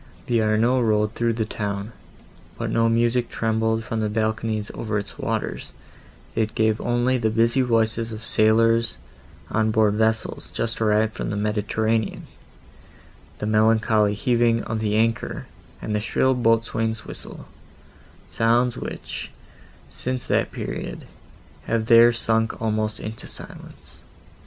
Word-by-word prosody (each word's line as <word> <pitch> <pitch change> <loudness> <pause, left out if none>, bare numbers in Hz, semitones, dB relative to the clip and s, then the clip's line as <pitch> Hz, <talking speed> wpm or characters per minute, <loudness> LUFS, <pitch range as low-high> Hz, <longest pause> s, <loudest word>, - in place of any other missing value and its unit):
The 120 -2 +2
Arno 110 +4 +2
rolled 105 -1 +1
through 115 0 0
the 110 -1 -1
town, 105 0 -4 0.7
but - - -3
no 115 0 +3
music 120 +1 +1
trembled 110 0 0
from 115 -1 -3
balconies 110 -1 -1
over 105 -2 -2
its 100 -1 -6
waters; - - -3 0.6
it 110 -1 -1
gave 110 0 +2
only 120 +1 +1
the 110 -2 +1
busy 115 +4 +3
voices 115 -1 +1
of 110 0 -8
sailors 115 - +3 0.5
on 110 0 +2
board 110 -1 +3
vessels 110 +1 -1
just 115 0 -3
arrived 110 0 +2
from - - -4
the 105 - -2
Mediterranean; 110 +1 -1 1.1
the - - -4
melancholy 110 -1 +3
heaving 115 0 +2
of 110 0 -3
the 105 -1 0
anchor, 115 -1 0 0.4
and 110 - -3
the 105 - 0
shrill 130 +4 +2
boatswain's 115 -2 0
whistle;—sounds, 120 +2 -3
which, - - -6 0.6
since 130 0 -3
that - - +1
period, - - -5 0.6
have 115 -1 0
there 115 +1 +7
sunk 115 -1 0
almost 110 -1 -1
into 110 +1 -7
silence. - - -11
110 Hz, 130 wpm, -23 LUFS, 110-115 Hz, 1.1 s, there